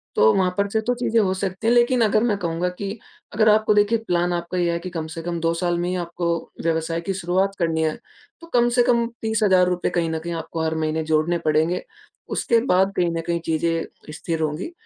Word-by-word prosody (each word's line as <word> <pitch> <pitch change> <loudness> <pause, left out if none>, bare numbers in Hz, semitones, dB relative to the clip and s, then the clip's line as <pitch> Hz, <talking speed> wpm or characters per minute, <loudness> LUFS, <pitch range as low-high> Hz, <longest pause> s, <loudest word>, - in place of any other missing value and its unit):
तो 110 +1 +5
वहाँ 185 -1 +1
पर 200 0 +2
से 220 - 0
तो 245 +3 0
चीज़ें 230 -2 +1
हो 190 -2 +1
सकती 190 +3 -3
हैं। 235 - +5
लेकिन 240 0 +3
अगर 215 0 +3
मैं 210 -4 +1
कहूँगा 170 0 -1
कि 200 +4 -6 0.4
अगर 215 0 +4
आपको 215 0 +4
देखिए 210 +2 +3
प्लान 175 0 +1
आपका 170 +1 -3
ये 175 -1 +1
है 170 - -2
कि 185 +1 -6
कम 160 -2 -5
से 165 - -5
कम 170 0 -3
2 165 0 +1
साल 175 0 -1
में 175 - -1
ही 185 - -1
आपको 170 0 -4 0.4
व्यवसाय 165 0 -1
की 195 +3 -3
शुरुआत 190 +2 0
करनी 165 -1 0
है, 155 - 0 0.5
तो 335 - -12
कम 240 0 +4
से 245 - +6
कम 235 -1 +2 0.2
₹30,000 190 -5 +2
कहीं 170 -2 -1
न 160 0 -2
कहीं 170 +1 -5
आपको 165 0 -4
हर 160 0 -1
महीने 160 0 -1
जोड़ने 160 +2 +1
पडेंगे, 160 +4 +1 0.5
उसके 230 -1 +2
बाद 190 -1 +2
कहीं 175 -1 +2
न - - -1
कहीं 170 0 0
चीज़ें 165 -1 -2
स्थिर 165 0 -3
होंगी। 155 - -2
175 Hz, 225 wpm, -22 LUFS, 165-205 Hz, 0.5 s, से